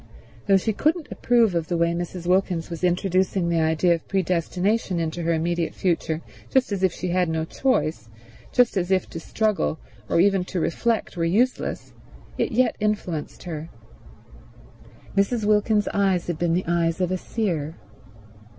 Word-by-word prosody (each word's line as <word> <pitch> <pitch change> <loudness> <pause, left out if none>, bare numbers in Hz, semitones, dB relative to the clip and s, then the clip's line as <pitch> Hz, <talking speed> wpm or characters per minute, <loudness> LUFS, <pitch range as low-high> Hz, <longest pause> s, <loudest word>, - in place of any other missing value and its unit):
Though 195 - +6
she 220 +3 -1
couldn't 310 - 0
approve 235 -5 +3
of 165 -2 -1
the 175 - -1
way 170 0 +2
Mrs. 175 0 -5
Wilkins 180 -2 +1
was 170 +1 -6
introducing 180 0 +1
the 170 -1 +2
idea 160 +2 +3
of 165 - -5
predestination 185 +1 0
into 165 +1 -2
her 170 0 0
immediate 170 +1 -1
future, 165 -3 -1 0.3
just 260 -4 +2
as 200 -2 -2
if 190 -2 +3
she 180 - -4
had 180 -1 +1
no 160 0 -1
choice, 160 - -1 0.4
just 245 -4 +3
as 175 -1 0
if 190 -2 +2
to 165 - -5
struggle, 210 -1 0 0.3
or - - +2
even 195 0 +4
to 185 - -3
reflect, 225 +7 -1
were 165 - 0
useless, 220 +10 0 0.4
it - - -1
yet 250 +2 +2
influenced 205 -7 -2
her. 160 -2 -6 1.5
Mrs. 205 +3 +1
Wilkins's 210 0 +2
eyes 195 -3 +2
had 170 -3 -3
been 170 -1 +1
the 180 - -1
eyes 170 0 +1
of 180 -1 0
a 185 - +1
seer. 170 -10 -2
180 Hz, 165 wpm, -24 LUFS, 170-205 Hz, 1.5 s, Though